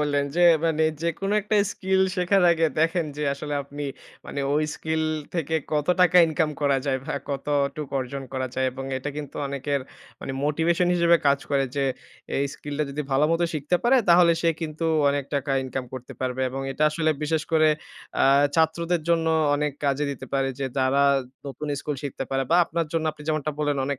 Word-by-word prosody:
বললেন, 145 -1 +1
যে - - +2 0.2
মানে 160 -1 +2 0.2
যেকোনো 195 +5 -1
একটা 210 +1 0 0.2
skill 190 0 0 0.2
শেখার 180 +1 +3
আগে 165 -1 +2
দেখেন 165 0 +1
যে 150 - -3
আসলে 145 +1 -5
আপনি 145 +1 -7 0.4
মানে 140 - -4
ঐ - - +2 0.2
skill 160 0 -2 0.3
থেকে 160 -1 -1 0.2
কত 150 -1 0
টাকা 180 0 +5
ইনকাম 160 -1 0
করা 140 -1 +3
যায় 130 -1 +1
ভা - - -2
কতটুক 140 +1 -1
অর্জন 135 +2 -4
করা 130 0 -2
যায় 130 0 +1
এবং 135 0 -6
এটা 145 +3 -4
কিন্তু 145 -2 -7
অনেকের 140 0 -2 0.4
মানে 135 - -5
motivation 165 +4 +1
হিসেবে 170 -1 +5
কাজ 140 0 +4
করে, 140 -1 +2
যে 140 - +1 0.5
এই 140 - +1
skill 145 -1 -7
টা 150 - +2
যদি 150 +2 -3
ভালোমত 150 +5 +2
শিখতে 155 +4 +1
পারে 260 +2 +5
তাহলে 170 0 +6
সে 165 - +4
কিন্তু 160 0 -4 0.3
অনেক 140 -1 -1
টাকা 140 0 -1
ইনকাম 130 0 -4
করতে 130 -1 -8
পারবে 130 0 -2
এবং 135 +1 -4
এটা 150 - -2
আসলে 160 0 +1
বিশেষ 155 0 0
করে 155 -1 +5 0.5
আ - - +6 0.3
ছাত্রদের 165 +1 +1
জন্য 165 -1 +2 0.3
অনেক 150 0 -1
কাজে 140 +1 +1
দিতে 140 - -7
পারে, 135 0 +1
যে 135 - -1
যারা 135 +2 +3 0.4
নতুন 150 +2 -6
স্কুল 150 -2 -3
শিখতে 135 -1 -4
পারে 135 0 +1
বা 170 - +5
আপনার 165 -1 -2
জন্য 160 -1 0
আপনি 150 - -13
যেমনটা 155 -1 0
বললেন, 145 -2 0
অনেক 140 -2 -2
150 Hz, 190 wpm, -25 LUFS, 140-165 Hz, 0.5 s, তাহলে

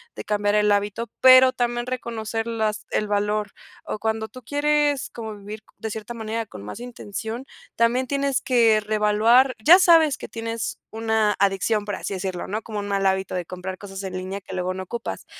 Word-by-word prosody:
de - - -6
cambiar 205 0 +1
el 210 0 +3
hábito, 205 +3 0
pero 255 0 +8
también 240 0 -1
reconocer 225 -2 -3
las 220 -2 -2
el 210 - 0
valor 210 0 0 0.3
o 215 - -4
cuando 220 0 -2
tú 255 - -12
quieres 290 +1 +1
como 220 -2 -7
vivir 210 +2 -9
de 220 - -5
cierta 220 +2 -6
manera 225 0 -3
con 100 - -11
más 105 - -7
intención, 235 0 -6 0.3
también 240 +3 +2
tienes 280 0 0
que 230 -4 +4
reevaluar. 215 +5 +3
Ya 350 +8 +9
sabes 325 -6 +5
que - - -9
tienes 230 0 -4
una 220 -2 +1
adicción, 200 +2 +1
por 205 -1 -3
así - - -5
decirlo, 185 -1 -4
¿no?, 215 +3 -3
como 215 -2 -5
un 205 - -4
mal 195 -1 0
hábito 190 0 0
de 180 -1 -2
comprar 185 +2 -6
cosas 195 -1 -8
en 190 -1 -5
línea 185 +2 -5
que 185 - -8
luego 185 0 -1
no 190 - -5
ocupas, 235 +5 -6
220 Hz, 190 wpm, -23 LUFS, 205-240 Hz, 0.3 s, Ya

